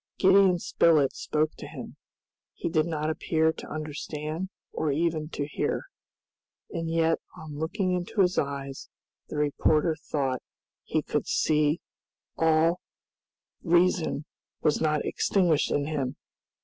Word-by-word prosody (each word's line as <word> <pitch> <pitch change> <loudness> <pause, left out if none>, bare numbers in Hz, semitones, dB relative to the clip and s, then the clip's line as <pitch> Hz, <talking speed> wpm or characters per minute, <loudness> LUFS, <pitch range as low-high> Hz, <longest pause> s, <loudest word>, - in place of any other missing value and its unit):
Gideon 190 -1 +6
Spilett 160 -4 +3
spoke 155 0 0
to - - -7
him. - - -8 0.6
He - - -3
did 155 -1 +2
not 155 -1 -1
appear 160 0 +1
to - - -9
understand 155 +3 -4 0.2
or 155 -2 -1
even 155 0 0
to 145 -3 -3
hear. 150 - -2 0.9
And 165 -1 -3
yet 165 0 +2 0.2
on 150 -2 -8
looking 185 +4 -1
into 180 +3 0
his 180 -1 +3
eyes, 140 -1 -4 0.4
the - - -5
reporter 150 +2 +2
thought 135 -5 -2 0.4
he - - -1
could - - -2
see 150 +1 +2 0.5
that - - -2
all 165 +2 +3 0.8
reason 175 -3 +2 0.4
was 150 - +2
not 155 -2 +1
extinguished 175 -6 +2
in 145 - +1
him. 145 -3 -2
155 Hz, 130 wpm, -27 LUFS, 150-170 Hz, 0.9 s, Gideon